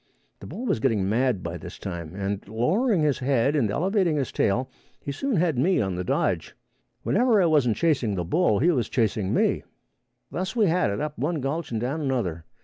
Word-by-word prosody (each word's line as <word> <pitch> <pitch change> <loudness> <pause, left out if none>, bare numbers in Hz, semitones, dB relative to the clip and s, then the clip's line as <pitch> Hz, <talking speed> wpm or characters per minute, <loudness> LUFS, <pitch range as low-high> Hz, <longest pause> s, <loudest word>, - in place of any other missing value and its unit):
The - - -10
bull 250 - -6
was 180 - 0
getting 110 -6 +1
mad 115 -1 +1
by 85 +1 -5
this - - -9
time, 85 -3 -6
and 100 0 -2
lowering 175 - +1
his 145 -3 +1
head 135 +2 +1
and 125 -8 +2
elevating 180 - +1
his 135 -3 -2
tail 120 +6 +1 0.3
he 140 - -5
soon 260 - -2
had 165 -7 +1
me 180 +8 +3
on 95 -3 0
the 90 +1 -3
dodge. - - -1 0.5
Whenever 235 0 +3
I 185 - +4
wasn't 140 -9 +3
chasing 130 -11 +1
the 90 -2 -2
bull, 110 - +2
he 170 - +3
was 125 -9 -1
chasing 105 -4 0
me. - - +1 0.7
Thus 185 +6 -3
we 225 -3 +3
had 180 - +2
it 100 - -2
up 150 -3 -4
one 155 +4 -1
gulch 145 +5 -3
and 115 - -2
down 135 +7 -2
another. 105 - -2
130 Hz, 205 wpm, -25 LUFS, 105-165 Hz, 0.7 s, I